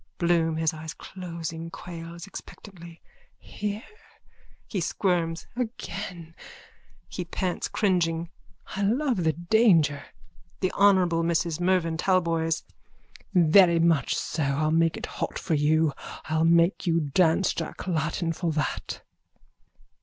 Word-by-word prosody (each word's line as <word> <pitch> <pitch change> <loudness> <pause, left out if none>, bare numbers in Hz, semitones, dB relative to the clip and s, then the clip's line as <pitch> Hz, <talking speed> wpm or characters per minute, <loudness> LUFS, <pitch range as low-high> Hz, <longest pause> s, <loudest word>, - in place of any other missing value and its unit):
BLOOM: 170 -2 +2
(His 160 -1 +1
eyes 155 0 -7
closing, 165 -2 -6
quails 170 -1 -8
expectantly.) 175 -4 -11 0.3
Here? 210 +1 -5 0.8
(He 195 - -3
squirms.) 165 -1 0
Again! 195 -8 -5 0.7
(He 180 - -5
pants 180 +1 -2
cringing.) 170 -4 0 0.4
I 195 - -2
love 235 - +1
the 160 -1 +2
danger. 170 -5 +3 0.5
THE 185 - 0
HONOURABLE 185 -4 +4
MRS 165 -1 0
MERVYN 175 -2 +1
TALBOYS: 165 -3 +1 0.7
Very 170 0 +6
much 165 -5 +2
so! 160 - -3
I'll 145 +2 +1
make 165 0 +2
it - - -4
hot - - -4
for - - -2
you. 155 0 +3 0.3
I'll 160 +1 +1
make 170 +3 +3
you 165 0 +3
dance 160 +5 +2
Jack - - -5
Latten 165 -1 -1
for 170 0 -2
that. 155 0 -3
170 Hz, 115 wpm, -26 LUFS, 160-185 Hz, 0.8 s, Very